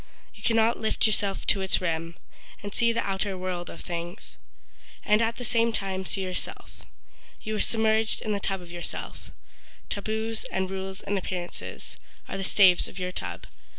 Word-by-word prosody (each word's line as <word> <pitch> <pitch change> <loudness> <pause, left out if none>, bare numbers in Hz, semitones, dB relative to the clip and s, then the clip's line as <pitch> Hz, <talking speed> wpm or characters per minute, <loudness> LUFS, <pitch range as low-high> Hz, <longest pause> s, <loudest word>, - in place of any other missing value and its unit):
You 210 - -14
cannot 225 +1 +3
lift 220 - +1
yourself 205 -2 +1
to 195 - +3
its 190 - +3
rim 165 -1 -2 0.5
And 205 0 -5
see 235 -1 +4
the 230 0 0
outer 195 0 0
world 180 -1 -3
of - - -8
things, 170 0 -5 0.7
And 210 +1 +5
at 230 0 +2
the 245 - -6
same 230 0 +3
time 190 -3 -2
see 195 - -1
yourself. 185 -1 -5 0.5
You 215 0 -2
are - - +1
submerged 220 -1 +3
in 215 - -1
the 205 - +1
tub 195 -1 -1
of 170 - -11
yourself— 175 0 -6 0.6
Taboos 220 +2 -1
and 190 0 -1
rules 190 0 -4
and 200 0 0
appearances, 180 -1 -5 0.3
Are - - -3
the 195 - -2
staves 190 -2 +6
of - - -10
your 180 -1 -2
tub. - - -5
195 Hz, 175 wpm, -28 LUFS, 185-220 Hz, 0.7 s, staves